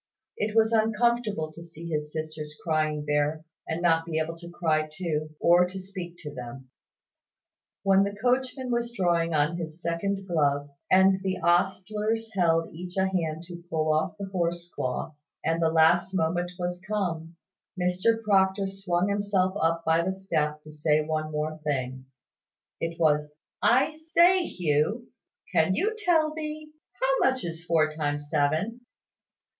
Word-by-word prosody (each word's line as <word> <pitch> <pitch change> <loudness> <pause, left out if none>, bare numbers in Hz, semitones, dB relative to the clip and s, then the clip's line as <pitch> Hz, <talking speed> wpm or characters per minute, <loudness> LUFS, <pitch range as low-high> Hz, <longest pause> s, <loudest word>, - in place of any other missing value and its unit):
It 210 +1 -2
was 220 0 +4
uncomfortable 220 -6 +1
to 165 - -10
see 170 0 -10
his 150 -1 -2
sisters 155 -1 -6
crying 155 -2 0
there, 150 +2 0 0.2
and 165 +2 -3
not 165 -1 +4
to 170 - -8
be 160 - 0
able 160 +1 -1
to 170 0 -9
cry 155 -3 0
too, 155 -2 -3
or 175 +1 +5
to 190 +1 -7
speak 185 -2 -7
to 150 -2 -6
them. 125 +1 -9 1.1
When 195 0 +5
the 200 0 -2
coachman 255 +3 0
was 235 0 0
drawing 170 -5 +1
on 150 +3 +2
his 160 -1 -6
second 195 +4 -2
glove, 145 -4 +1 0.2
and 190 0 +5
the 190 -1 -1
ostlers 210 +5 +1
held 165 -3 +2
each 180 +3 -8
a 190 0 +2
hand 165 -3 -2
to 175 0 -9
pull 155 -1 +1
off 155 +6 0
the 200 - -4
horse 175 -2 -2
cloths, 130 +4 -3 0.3
and 165 +1 +1
the 165 - +4
last 175 +3 +4
moment 175 +1 0
was 180 0 -3
come, 170 -6 -2 0.4
Mr 185 +6 +2
Proctor 195 -1 +3
swung 190 -2 -1
himself 200 -2 +1
up 165 +1 +1
by 160 +1 +4
the 190 +3 -1
step, 155 -6 -2
to 155 - -11
say 150 0 +2
one 155 0 -1 0.3
thing 140 -5 -1
more. 130 0 -11 0.7
It 165 0 -3
was 150 -2 +2 0.2
"I 270 +5 +3
say, 340 +3 +4
Hugh, 175 +8 0 0.4
can 165 +4 +3
you 435 - 0
tell 330 -7 +2
me, 305 -1 -6 0.3
how - - +2
much 260 -4 -3
is 165 0 -5
four 160 -3 +2
times 145 -1 -3
seven?" 155 +11 +1
175 Hz, 160 wpm, -27 LUFS, 155-200 Hz, 1.1 s, or